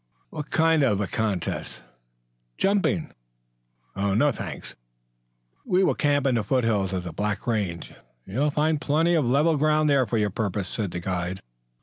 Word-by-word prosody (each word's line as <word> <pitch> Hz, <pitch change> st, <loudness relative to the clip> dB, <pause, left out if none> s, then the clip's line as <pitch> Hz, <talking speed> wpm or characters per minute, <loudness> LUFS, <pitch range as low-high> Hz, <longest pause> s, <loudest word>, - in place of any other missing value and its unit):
"What 150 Hz, -, -6 dB
kind 160 Hz, -1 st, +3 dB
of 105 Hz, -8 st, +2 dB
a 105 Hz, -, 0 dB
contest?" 95 Hz, -, -3 dB, 0.7 s
"Jumping." 195 Hz, -5 st, +1 dB, 0.8 s
"No, 100 Hz, +9 st, +2 dB
thank -, -, -7 dB
you." -, -, -10 dB, 1.0 s
"We 185 Hz, +1 st, +4 dB
will -, -, +3 dB
camp 145 Hz, -2 st, +1 dB
in 135 Hz, -, +3 dB
the 115 Hz, -3 st, +1 dB
foothills 115 Hz, -6 st, +1 dB
of 95 Hz, -2 st, -2 dB
the 85 Hz, -2 st, -7 dB
Black 105 Hz, +4 st, -2 dB
range. 100 Hz, -8 st, -2 dB, 0.3 s
You 100 Hz, +7 st, -5 dB
will 150 Hz, +1 st, +3 dB
find 150 Hz, +1 st, 0 dB
plenty 160 Hz, +4 st, +2 dB
of 150 Hz, -8 st, +2 dB
level 150 Hz, +4 st, +3 dB
ground 155 Hz, 0 st, +2 dB
there 135 Hz, -3 st, +3 dB
for 115 Hz, -, -1 dB
your 105 Hz, -2 st, +1 dB
purpose," 100 Hz, -1 st, -2 dB
said 105 Hz, -4 st, -2 dB
the 90 Hz, -, -5 dB
guide. 90 Hz, 0 st, -3 dB
120 Hz, 165 wpm, -25 LUFS, 100-150 Hz, 1.0 s, We